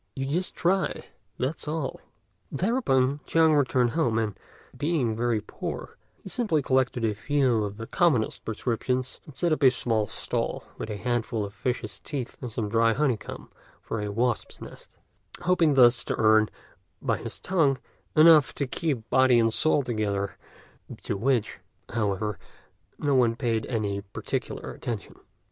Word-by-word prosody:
You 135 Hz, -, -2 dB
just 170 Hz, +7 st, -2 dB
try, 185 Hz, +2 st, 0 dB, 0.3 s
that's 140 Hz, +5 st, -3 dB
all." 150 Hz, -2 st, -3 dB, 0.5 s
Thereupon 140 Hz, -, +1 dB
Chang 160 Hz, -1 st, +4 dB
returned 130 Hz, -4 st, +2 dB
home; 120 Hz, -8 st, +1 dB
and, 110 Hz, -3 st, -1 dB, 0.4 s
being 145 Hz, -8 st, 0 dB
very 115 Hz, -1 st, 0 dB
poor, -, -, -6 dB, 0.3 s
he -, -, -9 dB
simply 190 Hz, -, 0 dB
collected 130 Hz, -3 st, +1 dB
a 110 Hz, -, +1 dB
few 125 Hz, 0 st, +1 dB
of 100 Hz, 0 st, -5 dB
the 115 Hz, -, -6 dB
commonest 145 Hz, -, +1 dB
prescriptions, 125 Hz, +3 st, -2 dB
and 150 Hz, -, -12 dB
set 170 Hz, +4 st, 0 dB
up 155 Hz, -, -2 dB
a 135 Hz, -, +8 dB
small 115 Hz, -3 st, 0 dB
stall -, -, -2 dB, 0.2 s
with -, -, -4 dB
a 105 Hz, -, -4 dB
handful 115 Hz, -1 st, -1 dB
of 100 Hz, -, -9 dB
fishes' 110 Hz, -5 st, -3 dB
teeth 130 Hz, -, -5 dB
and 125 Hz, -3 st, -5 dB
some 110 Hz, -1 st, -2 dB
dry 115 Hz, +1 st, +3 dB
honeycomb 130 Hz, -4 st, -2 dB, 0.3 s
from 115 Hz, -, -4 dB
a 105 Hz, 0 st, -3 dB
wasp's 120 Hz, +2 st, -1 dB
nest, -, -, -12 dB, 0.5 s
hoping 175 Hz, -4 st, +3 dB
thus 120 Hz, -2 st, +6 dB
to -, -, -1 dB
earn, 110 Hz, -1 st, +4 dB, 0.5 s
by -, -, 0 dB
his -, -, -8 dB
tongue, 160 Hz, -8 st, +2 dB, 0.4 s
enough 155 Hz, -2 st, +7 dB
to 140 Hz, -, -1 dB
keep 130 Hz, -4 st, -2 dB
body 130 Hz, -2 st, +5 dB
and 115 Hz, -1 st, +3 dB
soul 150 Hz, +1 st, +3 dB
together, 105 Hz, -5 st, -2 dB, 0.7 s
to -, -, -2 dB
which, 115 Hz, +1 st, 0 dB, 0.3 s
however, 105 Hz, -1 st, -1 dB, 0.6 s
no 145 Hz, -2 st, 0 dB
one 120 Hz, -3 st, +3 dB
paid 115 Hz, -3 st, -1 dB
any 105 Hz, -4 st, -1 dB
particular 100 Hz, 0 st, -5 dB
attention. 115 Hz, -4 st, -5 dB
125 Hz, 155 wpm, -27 LUFS, 110-145 Hz, 0.7 s, a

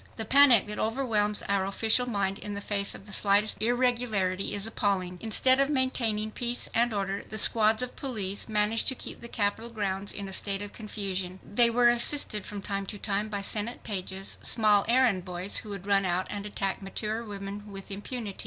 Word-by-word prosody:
The 220 Hz, -, -4 dB
panic 265 Hz, -2 st, +7 dB
that 210 Hz, 0 st, -7 dB
overwhelms 220 Hz, -3 st, 0 dB
our 200 Hz, -1 st, 0 dB
official 225 Hz, +5 st, +1 dB
mind 195 Hz, -3 st, -2 dB
in 205 Hz, -1 st, -6 dB
the -, -, -4 dB
face 200 Hz, -1 st, -1 dB
of -, -, -12 dB
the 210 Hz, -, -11 dB
slightest 205 Hz, +2 st, +2 dB
irregularity 230 Hz, -6 st, 0 dB
is 205 Hz, 0 st, -3 dB
appalling! 190 Hz, -5 st, -2 dB
Instead 255 Hz, +4 st, +3 dB
of 275 Hz, +1 st, +2 dB
maintaining 235 Hz, -6 st, 0 dB
peace 240 Hz, +2 st, 0 dB
and 235 Hz, +1 st, +2 dB
order, 200 Hz, -1 st, -3 dB
the 215 Hz, -, -6 dB
squads 220 Hz, +1 st, +4 dB
of 250 Hz, -, -6 dB
police 210 Hz, -7 st, -3 dB
managed 215 Hz, +1 st, +1 dB
to 260 Hz, -, +1 dB
keep -, -, -7 dB
the 235 Hz, -, -8 dB
Capitol 220 Hz, +1 st, -2 dB
grounds 200 Hz, -3 st, -2 dB
in 200 Hz, -1 st, -5 dB
a 190 Hz, -, -8 dB
state 200 Hz, +1 st, -1 dB
of 205 Hz, -, -9 dB
confusion. 195 Hz, -4 st, -5 dB
They 235 Hz, +3 st, +3 dB
were 240 Hz, +1 st, +4 dB
assisted 240 Hz, -3 st, +3 dB
from 205 Hz, -1 st, -7 dB
time 200 Hz, 0 st, -4 dB
to 205 Hz, -, -6 dB
time 205 Hz, +1 st, -2 dB
by 205 Hz, -1 st, -4 dB
Senate 215 Hz, +4 st, 0 dB
pages, 190 Hz, -2 st, -3 dB
small 210 Hz, -3 st, +4 dB
errand 235 Hz, -6 st, +2 dB
boys 180 Hz, +2 st, -1 dB
who 215 Hz, -, -3 dB
would 195 Hz, -2 st, -7 dB
run 200 Hz, -1 st, +2 dB
out 185 Hz, 0 st, -1 dB
and 205 Hz, 0 st, -5 dB
attack 195 Hz, -1 st, -3 dB
mature 215 Hz, +4 st, -5 dB
women 205 Hz, -1 st, -8 dB
with 195 Hz, 0 st, -10 dB
impunity. 205 Hz, +1 st, -6 dB
210 Hz, 195 wpm, -27 LUFS, 195-230 Hz, -, panic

